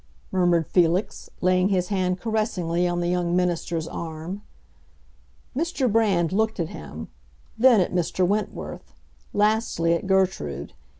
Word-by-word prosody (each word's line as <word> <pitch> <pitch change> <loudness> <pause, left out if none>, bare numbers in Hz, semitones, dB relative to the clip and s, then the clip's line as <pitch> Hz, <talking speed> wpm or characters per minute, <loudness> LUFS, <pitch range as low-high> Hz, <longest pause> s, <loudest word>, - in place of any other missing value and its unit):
murmured 175 -3 +2
Felix, 175 +4 +1
laying 185 +1 +3
his 180 -2 0
hand 185 -2 0
caressingly 185 -6 0
on 175 0 -1
the 175 - 0
young 175 -1 0
minister's 170 -2 -1
arm. 165 +5 -6 1.1
Mr. 305 -3 0
Brand 195 -7 +2
looked 220 +1 0
at 165 - -1
him; 75 +1 -8 0.5
then 240 -1 +6
at 180 - 0
Mr. 180 +1 +1
Wentworth; 205 +3 -3 0.4
lastly 210 -5 +2
at 170 +3 -2
Gertrude. 180 - 0
180 Hz, 125 wpm, -24 LUFS, 170-205 Hz, 1.1 s, then